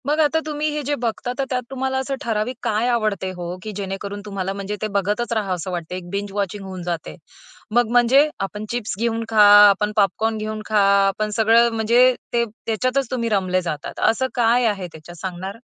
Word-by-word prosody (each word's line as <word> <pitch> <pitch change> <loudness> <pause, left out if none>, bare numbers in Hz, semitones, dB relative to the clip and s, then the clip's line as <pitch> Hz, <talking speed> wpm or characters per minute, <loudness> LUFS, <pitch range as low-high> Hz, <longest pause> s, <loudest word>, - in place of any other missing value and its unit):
मग 300 +2 +1
आता 315 +1 +3
तुम्ही 305 0 -2
हे 300 - -1
जे 290 +2 -1
बघता 235 +1 -2
तर - - +2
त्यात 250 -1 -1
तुम्हाला 265 0 -2
असं 265 +1 -2
ठराविक 225 0 -2
काय 220 +3 0
आवडते 215 -5 0
हो? 180 0 -6
की 215 - -5
जेणेकरून 200 +1 -5
तुम्हाला 195 -2 -3
म्हणजे 200 +1 -4
ते 215 - 0
बघतच 210 +5 0
राहाव 200 -5 -1
असं 180 +2 -5
वाटते. 175 0 -4
एक 180 -1 -8
बिंज 200 +1 -4
वॉचिंग 200 0 -3
होऊन 185 -1 -7
जाते. 170 -2 -4 0.6
मग 240 -2 +3
म्हणजे 250 +5 +5
आपण 210 +2 -4
चिप्स 235 -5 -3
घेऊन 230 0 0
खा, 220 -2 +5 0.3
आपण 210 +1 +1
पॉपकॉर्न 220 +2 +1
घेऊन 215 0 -4
खा, 215 -1 +1 0.3
आपण 210 +2 -1
सगळं 230 +2 +5
म्हणजे 235 +3 +4 0.2
ते, 235 0 +2
त्याच्यातच 250 +5 -2
तुम्ही 235 -3 -1
रमले 185 -3 +1
जातात, 155 -5 -5
असं 260 +4 0
काय 240 +1 +3
आहे 200 -5 -1
त्याच्यात, 160 +2 -12
सांगणार? 190 +2 -5
215 Hz, 195 wpm, -21 LUFS, 195-240 Hz, 0.6 s, म्हणजे